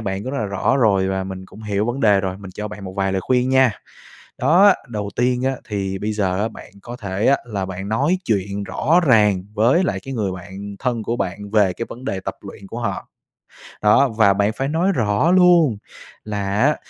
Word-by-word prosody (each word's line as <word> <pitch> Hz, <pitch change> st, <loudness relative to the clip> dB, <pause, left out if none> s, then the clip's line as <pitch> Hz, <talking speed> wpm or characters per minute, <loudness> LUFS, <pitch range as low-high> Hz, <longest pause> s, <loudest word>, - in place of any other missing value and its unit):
bạn 95 Hz, -2 st, -3 dB
rất 130 Hz, -, -4 dB
là 115 Hz, -, -1 dB
rõ 100 Hz, +6 st, 0 dB
rồi 100 Hz, -7 st, +2 dB
và 95 Hz, 0 st, -2 dB
mình 95 Hz, 0 st, -7 dB
cũng 110 Hz, -, -14 dB
hiểu 105 Hz, +1 st, -1 dB
vấn 120 Hz, +3 st, -2 dB
đề 105 Hz, -5 st, +4 dB
rồi 95 Hz, -1 st, -3 dB
mình 100 Hz, -2 st, -10 dB
cho 105 Hz, 0 st, -5 dB
bạn 105 Hz, -1 st, -9 dB
một 95 Hz, -, -7 dB
vài 95 Hz, -1 st, 0 dB
lời 95 Hz, -, 0 dB
khuyên 125 Hz, +5 st, +1 dB
nha. 130 Hz, -1 st, +4 dB, 0.7 s
Đó, 180 Hz, +9 st, +5 dB
đầu 105 Hz, -3 st, -4 dB
tiên 125 Hz, +1 st, +1 dB
á 135 Hz, -, +1 dB, 0.2 s
thì 95 Hz, -2 st, -3 dB
bây 105 Hz, +2 st, -2 dB
giờ 100 Hz, 0 st, 0 dB
bạn -, -, -12 dB
có 120 Hz, +1 st, -8 dB
thể 100 Hz, -2 st, -2 dB
á, 140 Hz, -, +5 dB
là 100 Hz, -5 st, -3 dB
bạn 95 Hz, +1 st, -6 dB
nói 140 Hz, -, +1 dB
chuyện 100 Hz, -1 st, -1 dB
rõ 145 Hz, -, +2 dB
ràng 105 Hz, -6 st, +4 dB
với 120 Hz, -, +3 dB
lại -, -, -2 dB
cái 135 Hz, -1 st, -7 dB
người 105 Hz, -5 st, -1 dB
bạn 100 Hz, +2 st, -8 dB
thân 120 Hz, -3 st, -1 dB
của 115 Hz, +2 st, -2 dB
bạn 100 Hz, 0 st, -4 dB
về 105 Hz, -3 st, +3 dB
cái 115 Hz, +6 st, -5 dB
vấn 125 Hz, +2 st, -10 dB
đề 100 Hz, -8 st, -3 dB
tập -, -, -5 dB
luyện 100 Hz, -, -11 dB
của 115 Hz, -, -7 dB
họ. 115 Hz, -, -3 dB, 0.7 s
Đó, 105 Hz, +6 st, +5 dB
và 110 Hz, -4 st, +3 dB
bạn 100 Hz, +2 st, +1 dB
phải 135 Hz, +5 st, -3 dB
nói 175 Hz, +6 st, +1 dB
rõ 110 Hz, -, +1 dB
luôn 175 Hz, -, +5 dB, 0.5 s
là 100 Hz, -1 st, -2 dB
á, 150 Hz, +2 st, +3 dB
105 Hz, 220 wpm, -20 LUFS, 100-125 Hz, 0.7 s, Đó